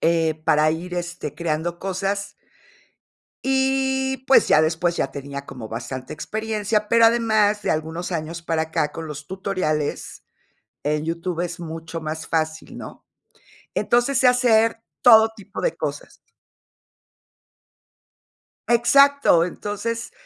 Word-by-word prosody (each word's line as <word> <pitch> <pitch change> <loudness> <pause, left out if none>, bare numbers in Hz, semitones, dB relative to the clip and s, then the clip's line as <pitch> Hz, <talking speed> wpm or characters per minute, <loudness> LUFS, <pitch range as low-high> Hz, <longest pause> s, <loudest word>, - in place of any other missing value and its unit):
eh, 165 -1 +2
para 155 -1 +4
ir, 175 +3 -4
este, 175 0 -5
creando 170 +1 -2
cosas. 195 +2 -2 1.1
Y, 265 0 +1
pues, 270 - +5
ya 155 - +5
después, 165 +2 0
ya - - 0
tenía 140 0 -7
como 120 -5 -9
bastante 125 +3 -6
experiencia, 215 +3 -2
pero 230 0 +5
además 220 -3 +3
de - - -1
algunos 160 +3 -3
años 165 0 -4
para 165 -1 -1
acá 160 -2 -1
con 160 +2 -7
los 150 -1 -8
tutoriales, 185 -6 -3 0.6
en 150 +1 -1
YouTube, 170 +1 -3
es 175 0 -5
mucho 165 0 -6
más 155 0 -5
fácil, 160 -1 -2
¿no? - - -10 0.7
Entonces, 245 +3 +2
sé 260 - +5
hacer 230 -2 +3 0.2
todo 225 -2 +7
tipo 205 -1 -9
de - - 0
cosas. - - -5 2.6
Exacto. 260 -5 +5
Entonces, 210 +5 -4
175 Hz, 120 wpm, -22 LUFS, 160-225 Hz, 2.6 s, todo